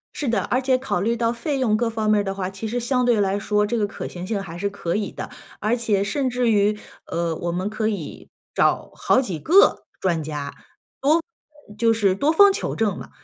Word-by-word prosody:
是 290 - -3
的。 235 - +1
而 255 +2 0
且 260 0 +2
考 255 -9 -2
虑 230 +4 +1
到 230 0 +1
费 270 +4 -2
用 225 -5 +2
各 235 +1 0
方 220 -1 -1
面 215 - +4
儿 - - -3
的 195 - -3
话， 190 -1 -3
其 195 +3 -6
实 240 +3 -2
相 250 +1 +1
对 240 -3 +3
来 195 0 +1
说， 210 0 +1
这 235 +3 -1
个 210 -2 +1
可 220 - -6
行 180 0 -7
性 200 0 -2
还 170 -3 -8
是 200 +3 -1
可 185 -4 -3
以 205 -2 -2
的。 - - -7 0.3
而 215 +3 +1
且 215 -5 +1
甚 260 +6 -1
至 245 -1 +1
于， 210 0 +3 0.3
呃， 170 -1 -1
我 170 +2 -3
们 185 +4 -2
可 215 0 -1
以 195 -8 -5 0.2
找 - - +1
好 255 - +3
几 190 -11 -4
个 365 - +4
专 170 -4 0
家， 145 -2 -5 1.2
多 210 - -12
就 230 +1 +3
是 205 -4 +2
多 285 +11 +2
方 400 +4 +7
求 - - -3
证 215 -4 0
嘛。 - - -10
215 Hz, 250 characters per minute, -23 LUFS, 195-240 Hz, 1.2 s, 方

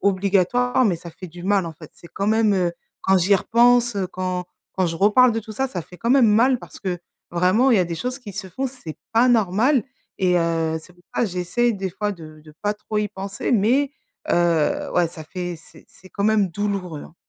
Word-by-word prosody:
obligatoire, 200 +6 +2
mais 190 -5 +2
ça 170 0 -10
fait 185 +3 -10
du 175 +2 -11
mal, 195 -2 +1
en 165 - -6
fait. 155 -1 -14
C'est 170 - -15
quand 200 - -2
même, 220 -1 +3
heu, 180 -2 +1 0.3
quand 190 0 +4
j'y 195 +3 +4
repense, 240 +1 +3
heu, 190 -2 0
quand 185 -1 -3 0.3
quand 185 -2 0
je 165 0 -3
reparle 215 +7 +5
de 225 - -1
tout 220 0 -10
ça, 265 +5 -1
ça 180 -8 -5
fait 180 - -15
quand 235 +5 -2
même 260 -4 +6
mal 240 +4 +4
parce - - -13
que 180 -3 -3 0.3
vraiment 185 +10 +3
il 230 - +5
y 190 - +4
a - - +2
des 170 0 -4
choses 250 +8 -4
qui 215 -6 -10
se 195 0 -6
font 265 +9 -3
c'est 250 - -9 0.2
pas 235 +3 +4
normal 230 +4 +3 0.3
et 180 -1 +2
heu, 165 -1 0
c'est 180 - -17
pour 175 - -25
ça - - +2
j'essaie 185 +6 0
des 195 -2 -4
fois 205 +3 -2
de 155 -3 -12
de 155 - -14
pas 205 0 0
trop 210 0 -4
y 210 - +1
penser 195 +4 -4
mais 255 +6 +2 0.4
heu, 170 -3 +1
ouais 175 -1 +3
ça 160 - -10
fait 175 +1 -5
c'est 160 - -18
c'est 185 - -18
quand 200 +1 -3
même 210 -3 +3
douloureux, 185 -4 -3
hein. - - -15
195 Hz, 235 wpm, -22 LUFS, 175-225 Hz, 0.4 s, même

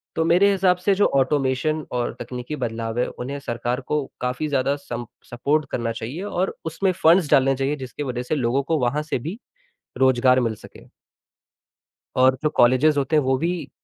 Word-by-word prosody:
तो 160 - +1
मेरे 180 +5 +4
हिसाब 185 -2 +3
से 180 +3 +1
जो 205 - +3
ऑटोमेशन 140 +2 +1
और 120 -1 -2
तकनीकी 125 +4 -6
बदलाव 115 -2 -3
हैं, - - +1
उन्हें 140 +3 -6
सरकार 120 0 -3
को 150 +1 -2 0.2
काफ़ी 125 +5 -2
ज़्यादा 140 0 +1
सम 120 -4 -6 0.3
सपोर्ट 145 +5 0
करना 115 -1 -1
चाहिए 120 - -6
और 190 -2 -2
उसमें 175 +4 0
फ़ंड्स 165 -1 +5
डालने 135 -2 +4
चाहिए 135 +2 -1
जिसकी 140 +4 -6
वजह 125 -2 -3
से 155 - -2
लोगों 130 +1 0
को 160 +3 0
वहाँ 130 +4 0
से 150 - -2
भी 165 - -6 0.6
रोज़गार 130 -1 +4
मिल 115 -3 0
सके। - - -15 1.3
और 130 0 +4
जो 150 - +1
कॉलेजेस 130 +5 +4
होते 140 +3 +1
हैं 150 - +4
वो 130 0 +1
भी, 165 -1 -2
135 Hz, 180 wpm, -23 LUFS, 125-155 Hz, 1.3 s, फ़ंड्स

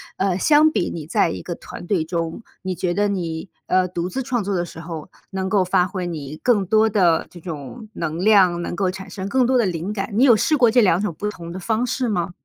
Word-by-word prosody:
呃， 190 -2 0
相 305 +7 +5
比 175 - 0
你 160 -3 -6
在 165 +1 +2
一 - - -5
个 175 - -5
团 175 - -10
队 175 -6 +1
中， 165 +5 -3 0.2
你 185 -1 -3
觉 175 0 -1
得 205 +1 +1
你， 170 -2 -3 0.2
呃， 185 0 +2
独 175 0 -3
自 265 +9 -3
创 245 -2 -1
作 200 0 -2
的 175 - 0
时 170 - -9
候， 165 -2 -7 0.2
能 190 0 -2
够 190 -3 +3
发 180 0 +3
挥 185 -1 -4
你 155 -3 -6
更 215 -6 +2
多 220 +3 +3
的 180 -6 +2
这 175 - -13
种 170 - -8
能 160 -5 -4
量， 190 -5 +5
能 170 - -4
够 185 +1 0
产 190 +1 -7
生 190 -2 -5
更 255 +4 +2
多 255 +1 +3
的 235 - +3
灵 175 +2 -2
感。 195 -1 -3
你 230 +5 +3
有 260 -4 +7
试 310 - +2
过 240 -5 +4
这 245 - +4
两 190 -5 +4
种 205 -5 -2
不 210 - -2
同 170 -5 -8
的 185 - -6
方 220 +5 0
式 250 +1 -1
吗？ 180 -5 -1
190 Hz, 270 characters per minute, -21 LUFS, 175-215 Hz, 0.2 s, 有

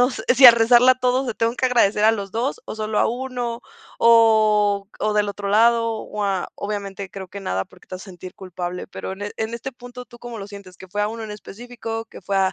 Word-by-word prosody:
no, 250 - +5
si 250 +1 +5
al 235 - +11
rezarla 240 +2 +5
a - - -3
todos 255 +1 +1
le 235 - -3
tengo 230 +1 0
que 260 - +1
agradecer 215 -4 +2
a 220 - +6
los 200 -3 -5
2 240 +6 -2
o - - -7
solo 215 0 -2
a - - +3
1 245 -1 -4 0.4
o 215 -3 +4
o 215 0 0
del 205 -1 +1
otro 200 0 -5
lado, 230 +2 +3
o, 210 -1 -5
a 195 -2 -1
obviamente, 200 -2 -5
creo 190 -2 -8
que 200 +2 -9
nada 95 - -2
porque - - -21
te - - -7
vas 185 - -11
a - - -11
sentir 185 -1 -11
culpable, 180 -1 -6
pero, 190 - -7
en 195 +1 -9
en 220 +1 -3
este 255 +3 -6
punto, 245 0 -11
¿tú 240 0 -16
cómo 240 -1 -8
lo 195 - -7
sientes? 200 -3 -12
¿Qué 190 - -12
fue 205 +3 -2
a 210 - 0
1 225 0 -6
en 215 - -8
específico, 225 +1 -7
que - - -13
fue 195 - -3
a 190 -1 +2
215 Hz, 250 wpm, -21 LUFS, 200-235 Hz, 0.4 s, al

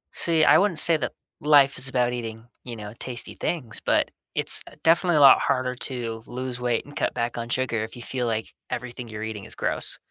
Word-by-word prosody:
See, 165 -2 +2
I - - +7
wouldn't 195 -4 +1
say 170 - +4
that 125 -5 -3 0.3
life 145 -2 +5
is 130 +1 +1
about 125 -1 +1
eating, 115 -2 -6 0.2
you 120 -2 -7
know, 105 -1 -8
tasty 120 -2 -3
things, 140 -10 -3
but - - +2 0.2
it's, - - +2
uh, - - -16
definitely 170 0 +4
a - - +5
lot 135 -2 +9
harder 130 -1 0
to 120 -3 -4
lose 125 0 -5
weight 120 -2 0
and 145 +1 -13
cut - - 0
back 120 +1 -2
on 115 0 -5
sugar 125 -4 0
if 110 - -7
you 120 - -9
feel 125 -1 -2
like 110 -1 -2 0.2
everything 125 0 -5
you're 110 -1 -6
eating 110 -2 -5
is - - -11
gross. - - -2
125 Hz, 220 wpm, -25 LUFS, 115-135 Hz, 0.3 s, lot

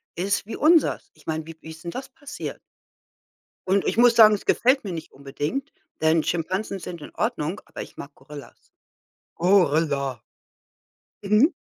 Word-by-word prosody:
ist 195 +3 -1
wie 225 - -6
unseres? 320 +1 +3
Ich - - -23
meine, 160 0 -3
wie 165 -1 -10
wie - - -10
ist 160 0 -12
denn 170 - -3
das 260 +8 -7
passiert? 285 +1 -8 1.1
Und 195 +1 +2
ich - - -1
muss 240 0 +6
sagen, 215 -2 +8
es 200 - -8
gefällt 260 +3 +3
mir 200 - -5
nicht 165 -2 -7
unbedingt, 145 - -4 0.3
denn 160 0 +3
Schimpansen 185 +4 -2
sind 170 -3 -8
in - - -11
Ordnung, 205 -6 -2
aber - - -8
ich - - -10
mag 140 - -9
Gorillas. 145 +1 -13 0.6
Gorilla. 150 - +2 1.0
Mhm. 215 - +4
180 Hz, 160 wpm, -24 LUFS, 155-230 Hz, 1.1 s, sagen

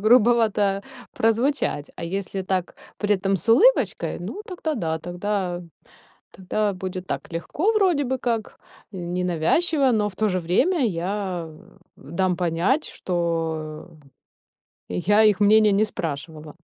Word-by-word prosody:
грубовато 215 -3 +3 0.3
прозвучать, 225 - 0
а 170 - -5
если 195 +2 -3
так 185 -1 -2 0.2
при 205 0 +2
этом 195 +1 0
с 190 +6 -4
улыбочкой, 465 - +4
ну 415 - -6
тогда 330 -5 -3
да, 160 -5 -2
тогда 180 +1 -3 0.7
тогда 200 +2 -1
будет 185 0 -5
так - - -5
легко, 290 - 0
вроде 365 -9 +2
бы 260 +1 -1
как, 230 -3 -2 0.3
ненавязчиво, 180 - +1
но 210 -2 +1
в 185 - -15
то 215 - +1
же 185 -2 0
время 250 - +2
я 180 -2 -3 0.5
дам 180 +3 -1
понять, 180 - +1
что 165 -2 -3 1.0
я 205 - +3
их 210 -3 +4
мнения 215 +1 +6
не 205 - +3
спрашивала. 155 -3 -6
195 Hz, 125 wpm, -23 LUFS, 175-225 Hz, 1.0 s, мнения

